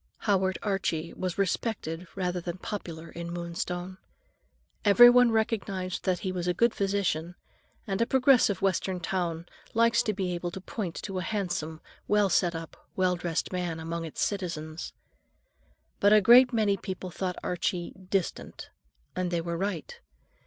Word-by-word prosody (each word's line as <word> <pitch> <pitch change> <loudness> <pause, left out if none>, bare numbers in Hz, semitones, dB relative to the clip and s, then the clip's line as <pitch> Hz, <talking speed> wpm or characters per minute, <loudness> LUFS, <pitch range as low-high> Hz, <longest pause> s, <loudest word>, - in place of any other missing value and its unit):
Howard 190 -3 +1
Archie 175 -5 -1
was 185 -2 -3
"respected" 185 -4 -2
rather 180 -2 -1
than 175 +1 -5
popular 170 -5 -6
in 170 0 -6
Moonstone. 175 +2 -4 0.8
Everyone 240 +3 +8
recognized 205 -5 -1
that 185 -2 +1
he 190 - -2
was 180 -1 -3
a 180 - +1
good 235 +4 +3
physician, 190 -4 -1 0.5
and 195 +1 -2
a 230 - +2
progressive 255 -8 +4
Western 190 -1 0
town 175 -2 -2 0.3
likes 230 +1 +4
to 215 - 0
be 190 -3 -2
able 175 0 -3
to 180 - -7
point 185 -2 -5
to 195 -2 -3
a - - -2
handsome, 175 -5 -3 0.3
well 210 -1 +3
set 175 -1 +2
up, 165 0 -9
well 185 -1 +2
dressed 175 0 -2
man 175 -3 -2
among 165 +1 -4
its 160 - -3
citizens. 165 -5 -3 1.1
But 205 +1 +5
a 215 - +8
great 245 +5 +7
many 215 -4 +2
people 185 -1 -6
thought 180 +1 -3
Archie 180 0 -2 0.2
"distant," 190 -3 -3 0.4
and 185 -1 -1
they 175 -1 0
were 170 0 -3
right. 205 - -3
185 Hz, 150 wpm, -28 LUFS, 170-205 Hz, 1.1 s, Everyone